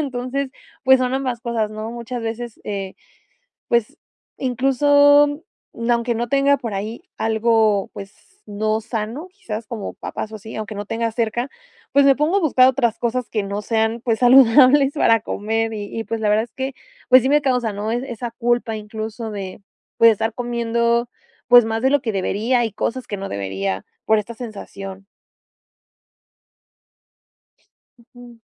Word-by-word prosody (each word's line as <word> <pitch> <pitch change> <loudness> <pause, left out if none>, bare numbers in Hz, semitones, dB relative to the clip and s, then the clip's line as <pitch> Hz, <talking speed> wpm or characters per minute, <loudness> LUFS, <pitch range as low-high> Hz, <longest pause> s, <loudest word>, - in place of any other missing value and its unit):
entonces, 265 0 -3 0.3
pues, 265 0 +6
son 255 0 0
ambas 255 -3 -2
cosas, 230 -3 -1
¿no? 215 +1 -6
Muchas 235 +1 -6
veces, 230 +1 -5
eh, 195 -2 -4 0.7
pues, 235 -2 0 0.4
incluso, 285 +3 +4 0.5
mm, 230 +1 -2
aunque 235 0 +1
no 235 +1 -2
tenga 280 0 +4
por 235 -5 -6
ahí 215 +8 -5 0.2
algo, 220 -2 +2
pues, 210 - -13
no 215 +1 -1
sano, 225 +9 -5
quizás 360 - -7
como 220 -2 -5
papas 220 - -6
o - - -5
así, 220 +2 -10
aunque 215 0 -5
no 205 0 -5
tenga 230 +1 -1
cerca, 240 +3 -2 0.4
pues, 280 0 +5
me 275 - +5
pongo 305 +6 +1
a - - -1
buscar 260 -6 +4
otras 240 -4 0
cosas 240 +1 -2
que 215 -3 -1
no 200 +1 -4
sean, 220 +1 0
pues, 230 -3 0
saludables 265 +2 +6
para 230 -6 +3
comer, 225 +1 -2
y 205 +1 -6
y, - - -4
pues, 225 0 -4
la 210 - +2
verdad 215 +1 +3
es 235 - -18
que, 265 0 -4 0.4
pues, 255 +1 +9
sí 260 - 0
me 295 +1 +3
causa, 250 -5 0
¿no?, 210 +2 -3
e - - +1
esa 235 0 -5
culpa 240 -1 0
incluso 220 +1 -6
de, 195 -2 -7 0.4
pues, 230 - +8
estar 225 +1 -2
comiendo, 235 0 0 0.4
pues, 245 -1 +8
más 225 0 -2
de 265 - +4
lo 285 -1 +2
que 230 -4 -2
debería 220 +6 0
y 225 - -3
cosas 250 +5 -3
que 205 - -4
no 195 0 -6
debería 95 -1 -3 0.2
por 220 - +4
esta 210 +3 -5
sensación. 195 -4 -8 2.9
Ujú. 240 0 -16
230 Hz, 165 wpm, -21 LUFS, 215-255 Hz, 2.9 s, pues